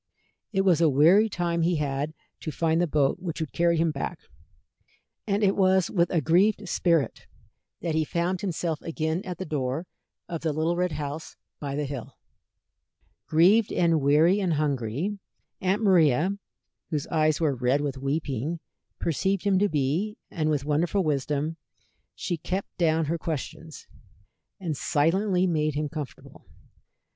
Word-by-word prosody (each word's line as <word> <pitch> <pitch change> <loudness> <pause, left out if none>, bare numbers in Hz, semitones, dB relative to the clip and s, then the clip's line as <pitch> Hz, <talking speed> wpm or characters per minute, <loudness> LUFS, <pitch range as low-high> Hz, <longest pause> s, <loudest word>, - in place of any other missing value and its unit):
It 195 -3 +2
was 180 -4 +3
a 165 - +5
weary 170 +11 +5
time 170 -3 -1
he 170 +2 +2
had 145 +1 -2 0.2
to - - -5
find 165 +2 +1
the 175 - +2
boat 145 -3 +1
which 170 -3 -5
would 160 -3 -3
carry 170 -1 +2
him 165 0 +2
back, 140 - -4 1.1
and 205 +1 +1
it 195 -1 +3
was 190 -2 +3
with 170 -2 +2
a 170 - +1
grieved 195 +6 +2
spirit 165 -8 0 0.5
that 165 -2 -1
he 160 0 +2
found 175 +3 -1
himself 170 -4 -2
again 160 +1 -2
at 180 -2 -5
the 185 - -5
door 145 +1 -2 0.4
of 170 -2 -5
the 160 -2 -1
little 160 +3 0
red 180 -1 0
house 150 +2 -5 0.2
by 140 -2 -4
the 150 0 -1
hill. 135 -4 -7 1.1
Grieved 190 +8 +4
and 165 -3 +2
weary 155 +8 +4
and 185 -4 +1
hungry, 145 - -1 0.4
Aunt 195 +4 +1
Maria, 170 - +4 0.6
whose 150 -4 -2
eyes 155 -2 +2
were 155 -4 +2
red 125 +3 +1
with 140 -2 -3
weeping, 140 +2 -2 0.4
perceived 190 +4 0
him 195 -2 +3
to 205 +1 +2
be, 160 +9 -1
and 155 -3 -1
with 145 -3 0
wonderful 165 +6 +1
wisdom 150 +1 -1 0.6
she 175 - -3
kept 185 +5 -4
down 160 -1 +2
her 165 +3 -2
questions, 160 0 -6 0.7
and 170 -5 -3
silently 180 +6 +1
made 155 -4 0
him 150 0 -1
comfortable. 150 -3 -8
160 Hz, 155 wpm, -26 LUFS, 150-180 Hz, 1.1 s, a